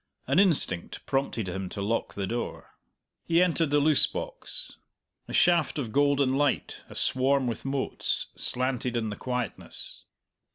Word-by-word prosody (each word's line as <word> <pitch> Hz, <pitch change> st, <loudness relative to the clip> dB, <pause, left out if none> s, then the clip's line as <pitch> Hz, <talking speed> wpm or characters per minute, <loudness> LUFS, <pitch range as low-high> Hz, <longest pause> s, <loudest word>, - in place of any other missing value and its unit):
An -, -, +3 dB
instinct 155 Hz, -, +2 dB
prompted 135 Hz, -6 st, -1 dB
him 95 Hz, +1 st, -4 dB
to 100 Hz, -, -7 dB
lock 115 Hz, +3 st, -1 dB
the 100 Hz, -, -2 dB
door. 120 Hz, +4 st, -4 dB, 0.5 s
He 170 Hz, 0 st, +2 dB
entered 170 Hz, -3 st, +2 dB
the 145 Hz, 0 st, +3 dB
loose 150 Hz, +1 st, +5 dB
box. -, -, -7 dB, 0.5 s
A -, -, -8 dB
shaft 170 Hz, -3 st, +3 dB
of 125 Hz, -7 st, -3 dB
golden 140 Hz, 0 st, +3 dB
light, 145 Hz, 0 st, 0 dB
aswarm 130 Hz, +1 st, +2 dB
with 120 Hz, 0 st, -3 dB
motes, 135 Hz, 0 st, -1 dB
slanted 125 Hz, -1 st, -1 dB
in 110 Hz, -2 st, -2 dB
the -, -, -4 dB
quietness. 125 Hz, -3 st, -4 dB
135 Hz, 140 wpm, -28 LUFS, 115-145 Hz, 0.5 s, loose